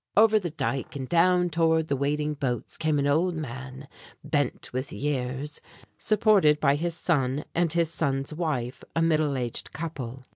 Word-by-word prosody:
Over 220 0 +6
the 180 -4 -3
dike 140 -4 -3
and 135 -2 -4
down 180 +2 +3
toward 160 0 +2
the 140 - 0
waiting 150 +2 0
boats 130 -5 -3
came 155 -2 0
an 140 - +1
old 165 +5 +2
man, 130 -2 -7 0.4
bent 145 -5 -1
with 130 +2 -3
years, 140 0 -3 0.4
supported 200 - +4
by 140 -2 +4
his 165 +3 -2
son 145 -4 0
and 170 -1 +1
his 165 -1 +1
son's 140 -3 -1
wife 145 -7 -3
a 165 - +2
middle 155 -4 +2
aged 120 -2 -4
couple. 135 -6 -6
150 Hz, 160 wpm, -27 LUFS, 135-165 Hz, 0.4 s, Over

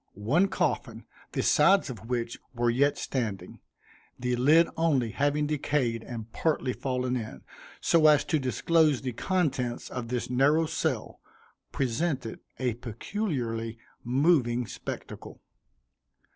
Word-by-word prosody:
One 140 - +2
coffin, - - -2 0.3
the - - 0
sides 175 0 +4
of 115 -1 -10
which 120 -1 -2 0.2
were 120 0 +2
yet 140 +4 +2
standing, 105 -8 -4 0.6
the 125 0 -1
lid 150 +7 +5
only 140 -9 +1
having 145 +4 +1
decayed 140 -5 0
and 115 -1 -8
partly 150 -5 0
fallen 125 -1 -2
in, 110 -3 -6 0.4
so 160 -2 +4
as 150 -1 +5
to 155 - 0
disclose 140 +3 +2
the 130 - -2
contents 135 - -1
of 125 -2 -4
this 125 0 -2
narrow 140 +6 +3
cell, 155 -7 -2 0.5
presented 130 -1 -2 0.2
a 125 -2 0
peculiarly 120 - -3 0.3
moving 125 -2 +2
spectacle. - - -8
130 Hz, 120 wpm, -28 LUFS, 120-150 Hz, 0.6 s, lid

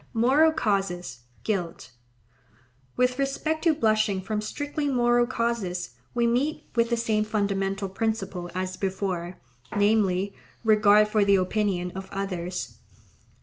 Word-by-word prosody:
Moral 275 +8 +5
causes: 195 - -2 0.2
guilt.—With 130 - -5
respect 310 +3 -1
to 325 -2 +4
blushing 215 -6 +2
from 210 +3 -3
strictly 290 +6 -3
moral 240 -2 +3
causes, 220 - -2 0.2
we 240 -1 +2
meet 255 +6 0
with 230 -1 +2
the 235 - +1
same 220 -2 +1
fundamental 200 -2 -1
principle 195 -3 -3
as 185 0 -3
before, 185 -2 -3 0.4
namely, 205 -2 +2 0.3
regard 210 -1 +5
for 210 -1 +2
the 200 0 +4
opinion 185 -1 0
of 190 +1 -8
others. 180 -2 -4
205 Hz, 115 wpm, -26 LUFS, 185-235 Hz, 0.4 s, Moral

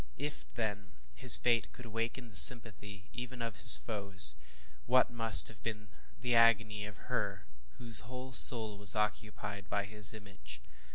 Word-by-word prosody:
If, 145 +2 -11
then, 105 -4 -9 0.2
his 125 - +4
fate 120 -1 -4
could 125 - -17
awaken 115 +2 -9
the 110 - -18
sympathy 105 -3 +5
even 125 +1 -12
of 115 -1 -10
his 115 - +4
foes, 100 -4 -1 0.5
what 130 0 -1
must 115 -8 +7
have 110 -2 -14
been 110 -2 -11 0.3
the 120 0 -6
agony 110 -2 -2
of 105 -1 -17
her, - - -7 0.3
whose 115 -2 -5
whole 130 +3 -13
soul 110 -5 -1
was 100 0 +1
occupied 105 -2 -9
by 100 0 -6
his 105 0 -2
image? 100 - -14
110 Hz, 155 wpm, -28 LUFS, 105-120 Hz, 0.5 s, must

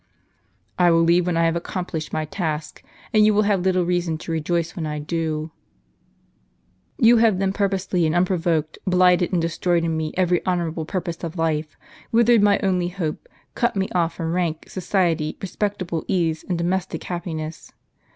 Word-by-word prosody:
" - - -43 0.3
I 175 -1 +5
will 165 0 +4
leave 170 +1 +3
when 175 -2 0
I 165 - +3
have 165 0 +1
accomplished 170 -2 -4
my 155 - -1
task, 155 -2 -4 0.3
and 215 -1 +5
you 210 0 +4
will 210 - +4
have 200 -3 +1
little 185 -1 +2
reason 175 -2 0
to 165 - -7
rejoice 165 +1 -1
when 160 -3 -3
I 150 0 -3
do. 155 0 -3 1.5
Ton 235 0 +6
have 225 -4 +4
then 190 0 0
purposely, 195 -4 0
and 155 - 0
unprovoked, 170 -3 0
blighted 180 -1 +4
and 180 - +1
destroyed 170 +1 0
in 165 -1 0
me 155 -1 -2
every 180 -2 +2
honorable 170 -3 -1
purpose 170 -1 -4
of 170 +1 -5
life, 155 -1 -1 0.3
withered 235 -1 +5
my 205 -1 +4
only 180 -2 +1
hope, 180 - -4 0.2
cut 240 -2 0
me 195 -1 -1
off 170 -2 +1
from 165 -1 -3
rank, 170 -3 -2
society, 175 -4 0
respectable 190 -4 -3
ease, 165 -4 0
and 180 - 0
domestic 180 +2 -2
happiness. 165 -3 -5
175 Hz, 170 wpm, -22 LUFS, 165-185 Hz, 1.5 s, Ton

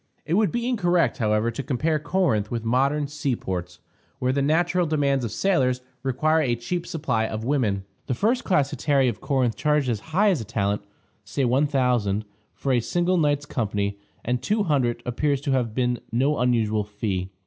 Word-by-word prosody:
It 160 - -2
would 205 -2 +3
be 240 0 -1
incorrect, 175 - +1
however, 105 +1 +1
to 115 - -4
compare 150 +4 0
Corinth 150 - +1
with 115 -1 -3
modern 135 +5 +2
sea 145 -3 -2
ports, 90 -4 -5 0.4
where 130 0 0
the 140 - +1
natural 175 +4 +2
demands 140 -4 +1
of 115 - -3
sailors 130 - +1 0.2
require 155 +5 +2
a 125 -5 +1
cheap 170 +9 -4
supply 125 -9 -1
of 110 0 -4
women. 115 -7 0 0.2
The 125 - 0
first 235 - +1
class 145 -8 +1
hetairæ 140 -4 +2
of 110 - -6
Corinth 130 -5 +1
charged 150 -3 +1
as 115 -3 0
high 200 +6 +3
as 165 -10 0
a - - -4
talent 100 -2 -1 0.4
(say 140 - -2
$1000) 125 -6 +1 0.3
for 135 - -2
a 125 - +4
single 175 +9 +1
night's 145 -2 +1
company, 100 -6 -2 0.3
and 120 +1 0
$200 140 - +1
appears 140 +3 0
to 145 -1 -1
have 120 -4 0
been 125 -2 0
no 135 +6 +1
unusual 115 -4 +2
fee. 100 -3 -3
130 Hz, 180 wpm, -24 LUFS, 115-155 Hz, 0.4 s, a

